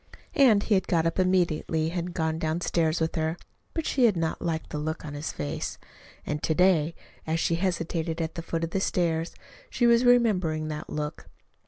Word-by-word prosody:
And 230 -8 +5
he 220 - +1
had 190 - +2
got 165 -2 +2
up 165 +2 0
immediately 175 -4 +1
and - - -9
had 175 0 -3
gone 160 -1 -1
downstairs 160 0 0
with 160 0 0
her. 160 +1 -1 0.4
But 325 -2 -1
she 260 -3 +3
had 210 -6 +3
not 165 -1 -1
liked 160 -2 -3
the 150 - -3
look 155 +1 -4
on 145 - -6
his 145 +2 -4
face. 70 -1 -4 0.5
And 150 0 -3
to 160 - 0
day, 170 -3 +3 0.3
as 160 +1 0
she 165 - +1
hesitated 165 -2 -1
at 160 -1 -2
the 170 - -5
foot 165 0 -3
of 165 - -2
the 195 - 0
stairs, 165 -3 0 0.3
she 240 - +1
was 235 0 +5
remembering 190 -11 +3
that 150 0 -5
look. 150 0 -4
165 Hz, 200 wpm, -27 LUFS, 160-185 Hz, 0.5 s, And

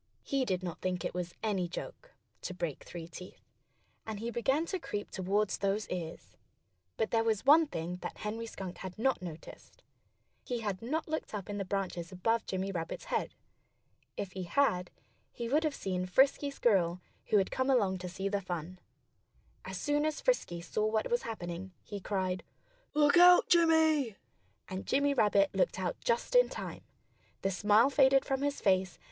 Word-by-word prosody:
He 275 -2 0
did 185 -3 -1
not 175 -1 -5
think 180 -1 -2
it - - -2
was 175 -1 -4
any 195 -5 0
joke, - - -8 0.3
to 185 - -5
break 170 -6 -4
three 170 -2 -8
teeth. 180 +2 -11 0.6
And 220 -2 -5
he 230 +2 -3
began 265 +7 +1
to 375 +2 -3
creep 205 -10 -5
toward 200 +2 0
those 200 +3 -1
ears. 170 -3 -6 0.6
But 220 - 0
there 225 -1 +3
was 225 0 0
one 310 +3 +7
thing 175 - -4
that - - -7
Henry 225 +2 -4
Skunk 185 -5 -7
had 185 0 -7
not 260 +1 +1
noticed. 175 - -10 0.6
He 245 -2 -3
had 200 -4 -3
not 305 +8 -2
looked 315 -8 -3
up 205 0 -5
in 205 - -3
the 195 - -2
branches 185 -3 -3
above 225 +5 0
Jimmy 190 +1 -2
Rabbit's 165 - -4
head. - - -1 0.8
If 195 - -4
he 190 - -5
had, 180 -4 +1 0.4
he 235 - -5
would 295 +6 +2
have 305 -3 0
seen 185 -1 -2
Frisky 270 +8 +3
Squirrel, 190 -10 +2 0.3
who 210 - +4
had 195 - +1
come 260 +1 0
along 200 -8 +2
to 180 0 -5
see 190 +2 -3
the 200 0 -1
fun. 180 0 -5 0.9
As - - -5
soon 295 0 +1
as 310 - -2
Frisky 175 - 0
saw 180 +5 -2
what 220 - 0
was 480 - +2
happening, 180 -3 -6
he 205 - -6
cried: 185 -2 -1 0.5
"Look 295 +2 +5
out, 355 0 +8
Jimmy!" 320 - +4 0.5
And 190 0 -6
Jimmy 285 +1 +2
Rabbit 205 -5 +3
looked 190 0 +1
out 185 -2 -1
just 235 - 0
in - - +6
time. - - -6 0.6
The 195 - +1
smile 210 +7 +4
faded 270 -1 +5
from 270 0 -1
his 285 0 -1
face. 185 -2 +2
205 Hz, 180 wpm, -32 LUFS, 185-270 Hz, 0.9 s, out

